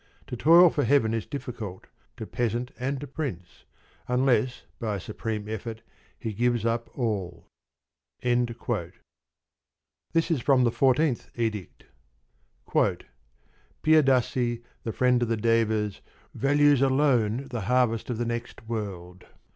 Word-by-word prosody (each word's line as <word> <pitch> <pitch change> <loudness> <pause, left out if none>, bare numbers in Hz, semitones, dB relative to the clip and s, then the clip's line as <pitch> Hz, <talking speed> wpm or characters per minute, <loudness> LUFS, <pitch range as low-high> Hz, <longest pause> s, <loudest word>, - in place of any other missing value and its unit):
To - - -6
toil 165 +7 +7
for 145 - 0
heaven 125 -6 +3
is 115 -2 -2
difficult 115 -9 -6 0.3
to 110 - -5
peasant 120 +2 -2
and 135 +2 -2
to - - -5
prince, 130 - -6 0.4
unless 125 -1 +1 0.2
by 110 -3 -2
a - - -4
supreme 105 +2 -5
effort 110 +1 -6 0.3
he 110 -2 -4
gives 120 +1 +1
up 115 0 -1
all. 100 -8 -2 0.8
This 120 -1 +2 1.8
is 150 -7 +1
from 130 0 +4
the 120 - +3
Fourteenth 135 +1 +2
Edict: 110 -5 -3 2.0
Piyadasi, 130 -5 +3 0.2
the 115 - -3
friend 125 +1 +2
of 120 - +1
the 115 - +1
Devas, 110 -2 +1 0.3
values 145 0 +3
alone 130 -3 +2
the 120 -3 -3
harvest 120 +1 +1
of 120 - -2
the 120 - -1
next 120 -1 -5
world. 95 -5 -6
120 Hz, 125 wpm, -27 LUFS, 110-130 Hz, 2.0 s, toil